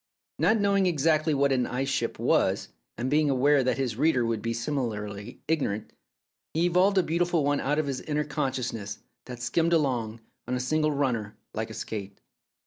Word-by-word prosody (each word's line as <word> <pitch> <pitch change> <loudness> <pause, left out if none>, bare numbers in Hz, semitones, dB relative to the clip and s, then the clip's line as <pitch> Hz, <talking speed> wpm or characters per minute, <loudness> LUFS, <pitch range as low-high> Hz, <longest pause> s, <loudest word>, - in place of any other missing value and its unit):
Not 220 - +4
knowing 200 -2 +3
exactly 155 -1 +2
what 140 0 +2
an 125 -2 +2
ice 130 +2 -2
ship 135 - -1
was, - - +1 0.3
and 120 +3 -2
being 150 +2 +3
aware 140 +1 +4
that 125 - +1
his 125 -5 -2
readers 140 -4 +3
would 115 -2 -1
be 115 - -2
simi 120 +5 -2
larly 105 -1 -5
ignorant, 135 -10 -1 0.6
he 165 +2 +3
evolved 185 +3 +3
a 190 - +5
beautiful 170 -1 +1
one 145 0 +1
out 145 +2 0
of 155 - +1
his 135 -2 -3
inner 150 -1 -1
consciousness 125 -8 -3 0.3
that 125 -1 -7
"skimmed 165 +6 +1
along 120 -8 0
" - - -47
on 125 - -1
a - - -1
single 155 +4 +1
runner 120 -7 -1 0.2
like 110 +1 -3
a 110 - -8
skate. 100 -2 -6
135 Hz, 190 wpm, -27 LUFS, 115-155 Hz, 0.6 s, a